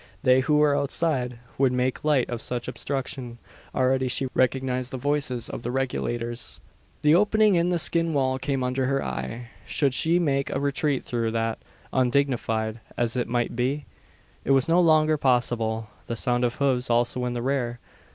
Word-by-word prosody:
They 130 -1 +5
who 150 +3 +2
were 150 -1 +4
outside 140 -3 0 0.2
would 135 -2 +4
make 125 0 -1
light 150 -5 +2
of 120 -1 -4
such 125 -1 -3
obstruction. 130 -1 -4 0.4
Already 130 0 +2
she 135 +2 0
recognised 130 0 0
the 130 - -5
voices 135 -3 -1
of - - -6
the 120 - -4
Regulators! 120 -2 -3 0.4
The 150 +1 +5
opening 210 +3 +4
in 170 0 +2
the 175 - +1
skin 165 0 +2
wall 130 -3 +1
came 135 -1 -1
under 130 +1 0
her 135 0 0
eye. 120 +1 -5 0.2
Should 140 -4 +1
she 165 +6 +2
make 140 -5 0
a - - -1
retreat 140 0 0
through 115 -2 -1
that, 115 0 -1 0.3
undignified 120 -4 0 0.2
as 120 0 0
it 125 - -1
might 120 0 -1
be? 135 +4 -1 0.6
It - - 0
was 135 -1 +3
no 170 +2 +4
longer 155 -2 +4
possible. 115 -5 0 0.2
The 115 - -3
sound 120 +2 +1
of 120 0 0
hoofs 130 -3 +1
also 120 +1 +1
in 125 - -2
the 120 -1 -3
rear! 125 -3 -1
130 Hz, 175 wpm, -25 LUFS, 120-140 Hz, 0.6 s, They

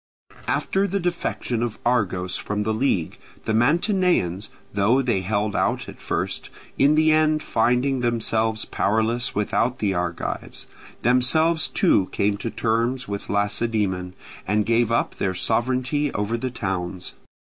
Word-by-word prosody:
After 195 +1 +1
the 200 +1 -1
defection 170 -9 -2
of 120 -2 -2
Argos 95 -7 0
from 105 0 -2
the 110 +1 0
league, 110 - 0 0.3
the 110 - 0
Mantineans, 150 - +2 0.2
though 110 +7 +3
they 115 -7 +1
held 105 +2 -1
out - - 0
at - - -11
first, - - -3 0.3
in 145 +2 +5
the 155 0 +4
end 155 0 +3
finding 125 +4 +1
themselves 115 -2 0
powerless 110 +4 0
without 115 +4 0
the 100 -2 0
Argives, 85 -1 -4 0.4
themselves 155 +7 +3
too 100 - +2
came 100 0 +1
to 110 +3 -4
terms 115 +3 -1
with 100 0 -5
Lacedaemon, 100 -3 0 0.3
and 105 +1 +1
gave 115 0 +2
up 115 - 0
their 95 -1 -1
sovereignty 130 +8 0
over 105 +3 -1
the 130 +2 -2
towns. 95 -5 -4
115 Hz, 135 wpm, -23 LUFS, 100-130 Hz, 0.4 s, in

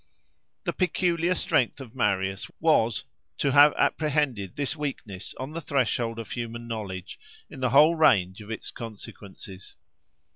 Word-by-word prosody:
The - - -2
peculiar 180 -1 +1
strength 130 -6 +1
of 125 -4 -10
Marius 95 -5 0
was, 125 -7 +2 0.3
to 140 - +1
have 145 +2 +8
apprehended 140 - 0
this 145 +1 -1
weakness 110 -11 -6
on 130 +3 -5
the 165 +1 -5
threshold 120 -5 0
of 115 -3 -7
human 120 -1 -5
knowledge, 100 -5 -6 0.3
in - - -9
the 130 -1 +1
whole 150 +6 +6
range 100 - +3
of 105 - -11
its 110 - -5
consequences. 100 -4 -10
120 Hz, 140 wpm, -26 LUFS, 105-150 Hz, 0.3 s, have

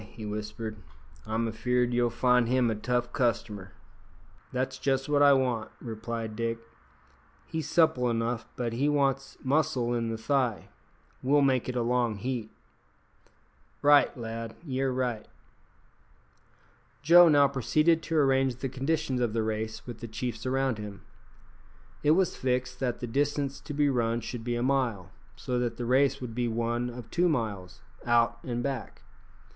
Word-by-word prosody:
he 110 -2 -8
whispered, 105 +1 -5 0.5
"I'm 110 +1 0
afeard 125 +2 0
you'll 120 0 +2
find 125 0 +3
him 125 -1 +2
a - - -1
tough 120 +3 -1
customer." 105 -6 -1 0.8
"That's 130 +1 -2
just 135 -1 0
what 145 -1 +2
I 145 -1 +7
want," 125 -5 0
replied 115 -1 -5
Dick. 115 0 -1 0.9
"He's 160 -2 -4
supple 160 -8 +3
enough, 115 0 -1
but 120 -2 -2
he 140 +5 +1
wants 135 -2 0
muscle 135 -3 +1
in 115 -1 -1
the 115 - -3
thigh. 125 -2 0 0.5
We'll 140 +2 +3
make 130 -2 +2
it 125 - -3
a 120 - +1
long 120 -2 +1
heat." 115 +1 -4 1.3
"Right, 145 -2 +5
lad, 115 -1 -6
ye're 135 -2 -1
right." 125 -4 -2 1.8
Joe 170 +3 +8
now 145 -2 +6
proceeded 155 +5 +2
to 165 0 -2
arrange 135 -3 +3
the 135 +2 -4
conditions 135 -1 -1
of 120 -3 0
the 115 -1 0
race 110 0 -3
with 120 -2 -8
the 115 - -6
chiefs 115 +2 -4
around 130 -3 0
him. 105 -1 -8 1.0
It 150 - +3
was 190 -2 +1
fixed 125 -1 -1
that 125 -3 -2
the - - -2
distance 140 +2 -1
to 145 - -7
be 145 0 +3
run 120 -3 0
should 115 +1 -6
be 120 0 -2
a 120 - -1
mile, 125 -9 0 0.2
so 125 -1 -2
that 120 -1 -2
the 120 - -3
race 130 +3 +3
would 120 -3 -5
be 120 +1 -1
one 120 +1 -1
of 120 -2 -9
two 175 +1 +2
miles, 105 - -3 0.2
out 115 0 +2
and 120 -1 -3
back. 135 -3 -5
125 Hz, 160 wpm, -28 LUFS, 115-135 Hz, 1.8 s, Joe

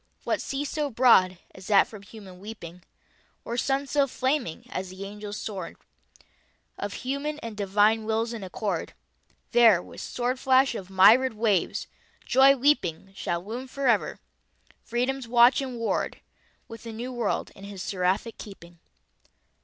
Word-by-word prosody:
What - - -1
sea 275 +1 -3
so 295 0 -2
broad, 225 -7 +4 0.2
as 190 -1 -12
that 200 -2 +5
from 215 -3 -11
Human 200 -3 -13
weeping? 180 -4 -9 0.6
Or 235 - -4
Sun 270 +3 0
so 280 0 +1
flaming, 260 - -2
as 185 0 -4
the 190 +2 -8
Angel's 210 +1 -7
sword 200 -3 -6 1.0
Of 205 +5 -6
Human 280 +3 -2
and 230 -2 -7
Devine 205 +2 +2
Wills 225 +1 -1
in 225 -4 -6
accord? 185 -1 -3 0.6
There, 230 -6 +6
with - - -10
sword 250 +1 -2
flash 260 0 +4
of 195 -5 -7
myriad 220 +7 +6
waves, 215 -4 0 0.4
joy 270 +1 +6
leaping, 215 - 0
Shall 175 -2 -3
loom 240 +5 -6
forever, 255 -5 0 0.6
Freedom's 250 +2 -2
watch 240 +2 +5
and 260 -3 -5
ward, 230 -1 -2 0.5
With 230 -1 -10
the 230 -1 -8
New 245 +3 -6
World 240 -2 -2
in 195 - -11
his 200 -2 -7
Seraphic 190 +4 -1
keeping. 175 -4 -12
225 Hz, 145 wpm, -26 LUFS, 195-255 Hz, 1.0 s, There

